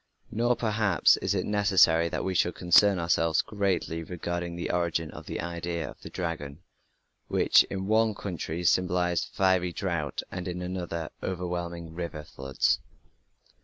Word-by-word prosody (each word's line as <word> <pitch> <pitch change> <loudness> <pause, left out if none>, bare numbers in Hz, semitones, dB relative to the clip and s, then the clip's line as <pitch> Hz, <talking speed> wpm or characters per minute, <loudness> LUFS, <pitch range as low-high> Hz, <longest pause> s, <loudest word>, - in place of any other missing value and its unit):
Nor, 120 +2 +2
perhaps, 105 -5 +3
is - - -1
it - - -1
necessary 95 -5 +4
that - - -3
we 95 - -1
should 90 -1 +1
concern 95 +3 +5
ourselves 85 -1 +2
greatly 95 -5 -1
regarding 85 0 -4
the 85 - -3
origin 85 -2 -1
of - - -11
the - - -4
idea 85 -2 -3
of - - -11
the - - -8
dragon, 80 -3 -5 0.6
which - - +5
in 95 -1 -4
one 110 +1 +2
country 85 -3 -4
symbolized 90 0 +1
fiery 95 -2 +2
drought 85 -5 -3
and 90 0 -5
in 90 0 -4
another 85 -3 -4
overwhelming 85 -2 -4
river 85 -3 -5
floods. 65 -2 0
85 Hz, 145 wpm, -28 LUFS, 85-95 Hz, 0.6 s, concern